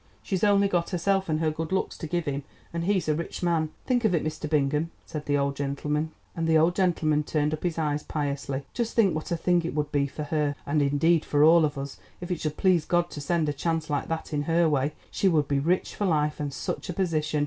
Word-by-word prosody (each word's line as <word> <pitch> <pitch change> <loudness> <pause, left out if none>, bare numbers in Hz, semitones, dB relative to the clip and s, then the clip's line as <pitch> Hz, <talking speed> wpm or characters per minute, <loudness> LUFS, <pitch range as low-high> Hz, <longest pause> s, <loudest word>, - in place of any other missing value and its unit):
She's 190 -2 -2
only 200 -1 +5
got 175 -3 0
herself 190 +1 0
and 155 0 +1
her 155 -1 +2
good 160 +2 -4
looks 190 - 0
to 160 - -4
give 175 +1 -1
him, 140 -1 -2 0.3
and 170 0 -2
he's 195 -3 +1
a 155 - +3
rich 165 +3 -4
man. 165 -3 +1 0.2
Think 250 -2 +1
of 205 -5 +3
it, 160 - 0
Mr. 155 0 -4
Bingham," 150 +1 +1 0.2
and 150 -1 -4 1.2
the 160 -1 +5
old 175 - -2
gentleman 155 -3 +1
turned 150 0 0
up 155 - -4
his 175 -2 -2
eyes 150 -2 0
piously, 140 -2 -3
"just 235 -1 -2
think 200 -7 +4
what 155 +3 -4
a 170 - 0
thing 175 +1 +2
it 165 - -4
would 150 -1 -1
be 140 -1 +1
for 150 +2 -6
her, 150 -1 0
and 145 +1 +1
indeed 145 +4 +3
for 145 0 +2
all 165 +1 +7
of 145 -1 -3
us, 140 0 -6 0.2
if 175 +1 -6
it 175 - -2
should 155 -1 -2
please 180 -4 +3
God 175 +1 +1
to 145 - -6
send 160 +2 0
a 145 - 0
chance 160 +1 -2
like 145 - -1
that 165 -1 -4
in 145 - +1
her 165 0 +4
way; 145 -1 +1 0.2
she 195 - +1
would 155 -5 +3
be 140 -1 +1
rich 175 +6 0
for 205 - -2
life, 150 -3 +1
and 145 -1 -2
such - - -4
a - - -1
position! 155 -4 0
160 Hz, 240 wpm, -27 LUFS, 150-175 Hz, 1.2 s, all